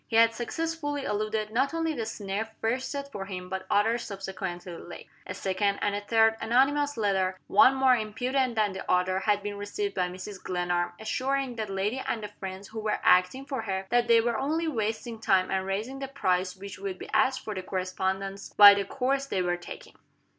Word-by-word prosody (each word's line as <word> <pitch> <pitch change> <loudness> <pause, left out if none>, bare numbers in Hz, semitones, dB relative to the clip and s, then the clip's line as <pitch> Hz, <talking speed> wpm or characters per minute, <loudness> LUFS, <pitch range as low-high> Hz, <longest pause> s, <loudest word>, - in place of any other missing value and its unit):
He 225 - -3
had 230 0 +6
successfully 290 +3 -3
eluded 215 0 -1
not 270 +7 +1
only 325 -1 0
the 230 -6 -3
snare 210 0 -3
first 255 +4 -1
set 280 0 -5
for 195 -4 -5
him, 180 -2 -7
but 190 0 -5
others 225 +3 +2
subsequently 190 -3 -6
laid. 175 +1 -10 0.2
A - - -5
second, 200 +1 0
and 205 - 0
a 205 - -2
third, 225 +1 +3
anonymous 275 +5 +2
letter, 190 -3 +1
one 270 -1 +6
more 265 -1 +5
impudent 245 +3 -1
than 210 -3 +1
the 190 - -4
other 180 +1 +2
had 205 0 +1
been 205 0 -4
received 400 - -3
by 180 -1 0
Mrs. 185 +2 -8
Glenarm, 175 -1 -1
assuring 260 +3 -1
that 215 -2 -3
lady 200 +7 -1
and 220 - -2
the 210 - -5
friends 190 +1 -7
who 220 - -6
were 215 0 0
acting 185 +10 +4
for 270 -4 -3
her 195 -3 -3
that 240 0 +3
they 230 -1 +6
were 235 -1 0
only 320 +4 0
wasting 225 -3 -2
time 190 -3 +2
and 190 0 -1
raising 220 +8 -3
the 270 - -4
price 185 -8 0
which 195 0 -9
would 195 -1 -4
be - - -8
asked 265 - +2
for 215 - -3
the 190 - -4
correspondence, 190 +1 -3
by 205 -1 +11
the 200 0 -1
course 270 +4 -1
they 190 -7 0
were 175 0 +1
taking. 175 - -10
215 Hz, 205 wpm, -28 LUFS, 190-255 Hz, 0.2 s, by